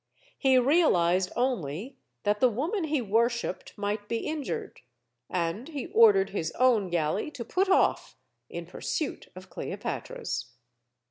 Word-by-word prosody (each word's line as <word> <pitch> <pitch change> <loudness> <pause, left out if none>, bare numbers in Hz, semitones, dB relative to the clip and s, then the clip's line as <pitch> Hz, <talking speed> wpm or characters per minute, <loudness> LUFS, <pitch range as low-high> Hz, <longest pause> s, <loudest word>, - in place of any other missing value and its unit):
He 265 -2 +4
realized 190 - +3
only 235 - -2 0.3
that 210 0 +1
the 255 - +5
woman 320 - -1
he 295 -4 0
worshipped 230 -1 -1
might 205 0 -2
be 230 -1 -2
injured. 305 -3 -4 0.5
And 175 +7 -2
he 295 -5 -5
ordered 425 -3 +6
his 165 -5 -2
own 230 -7 +3
galley 170 - 0
to 265 -6 -7
put 380 - +1
off 380 - +2 0.3
in - - -6
pursuit 305 -4 -4
of 185 0 -12
Cleopatra's. 125 -6 -5
235 Hz, 130 wpm, -28 LUFS, 185-290 Hz, 0.5 s, ordered